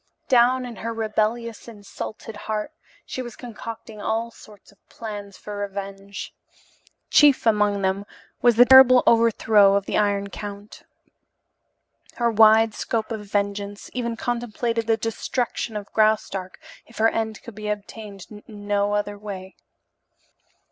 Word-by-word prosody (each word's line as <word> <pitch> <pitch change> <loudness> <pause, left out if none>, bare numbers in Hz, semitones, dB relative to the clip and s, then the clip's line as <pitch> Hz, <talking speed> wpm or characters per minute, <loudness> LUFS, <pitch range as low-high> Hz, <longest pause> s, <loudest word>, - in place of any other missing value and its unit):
Down 255 +1 +4
in 240 -3 -8
her 230 +4 -4
rebellious, 225 +1 -2
insulted 215 0 -8
heart 215 +5 -4 0.3
she 255 - -5
was 240 -2 -8
concocting 225 -2 -9
all 225 +2 -2
sorts 210 -3 -17
of 200 - -26
plans 205 -3 -8
for 210 -1 -8
revenge. 200 0 -6 0.8
Chief 290 -4 +5
among 210 -2 +2
them 195 +2 -1 0.3
was 240 -2 +5
the 245 +2 +8
terrible 260 -1 +8
overthrow 220 -3 +4
of 200 -1 0
the - - 0
Iron 200 -1 0
Count. 205 0 -8 1.3
Her 235 -1 +1
wide 220 0 +6
scope 225 +1 -3
of 210 -2 -5
vengeance 200 0 -3
even 235 -2 -3
contemplated 235 -1 -2
the 225 -1 +3
destruction 225 0 -3
of 205 -1 -9
Graustark 210 -4 0 0.3
if 230 - -16
her 225 +1 +4
end 220 -1 -3
could 235 - -10
be 210 +1 -6
obtained 205 -1 -6
in 210 -1 -11 0.2
no 205 0 +1
other 205 0 -2
way. 195 -2 -8
215 Hz, 135 wpm, -23 LUFS, 205-230 Hz, 1.3 s, the